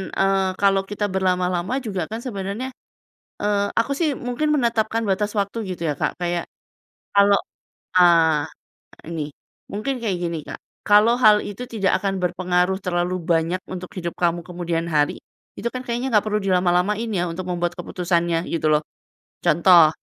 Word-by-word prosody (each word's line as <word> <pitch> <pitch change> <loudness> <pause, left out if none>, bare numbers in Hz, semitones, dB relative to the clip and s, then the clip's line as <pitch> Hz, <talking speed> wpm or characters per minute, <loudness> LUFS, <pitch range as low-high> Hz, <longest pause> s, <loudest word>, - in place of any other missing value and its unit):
eee, 195 0 +2
kalau 195 -1 +4
kita 205 +1 -2
berlama-lama 185 +1 0
juga 195 -6 -3
kan 220 - -3
sebenarnya 205 +1 -4 0.7
eee, 205 -1 +1 0.2
aku 230 +5 0
sih 330 -3 +2 0.2
mungkin 250 +5 0
menetapkan 230 -3 +1
batas 205 +2 0
waktu 200 +3 -2
gitu 180 - -7
ya - - +1
Kak, - - +1
kayak 175 0 -1 0.7
kalau, 200 0 +5 0.6
eee, 160 -4 +3 0.4
ini 165 -2 -3 0.5
mungkin 215 +7 -2
kayak 205 -5 0
gini 170 -1 -2
Kak, - - -6 0.3
kalau 210 +3 +6
hal 210 -1 +8
itu 205 +4 -7
tidak 195 -4 +1
akan 195 -1 0
berpengaruh 180 +1 +1
terlalu 175 0 0 0.2
banyak 165 +3 +1
untuk 180 0 -5
hidup 170 -1 -4
kamu 175 0 +2
kemudian 170 -1 -2
hari, 150 -2 +1 0.4
itu 235 - -1
kan 255 - -3
kayaknya 240 +2 -2
nggak 210 - +5
perlu 210 0 +1
dilama-lamain 185 +3 +1
ya 180 -3 0
untuk 180 +2 -5
membuat 175 -1 -1
keputusannya 170 -1 -1
gitu 165 -2 -1
loh. 150 0 +3 0.6
Contoh 170 0 +6
185 Hz, 155 wpm, -22 LUFS, 175-210 Hz, 0.7 s, hal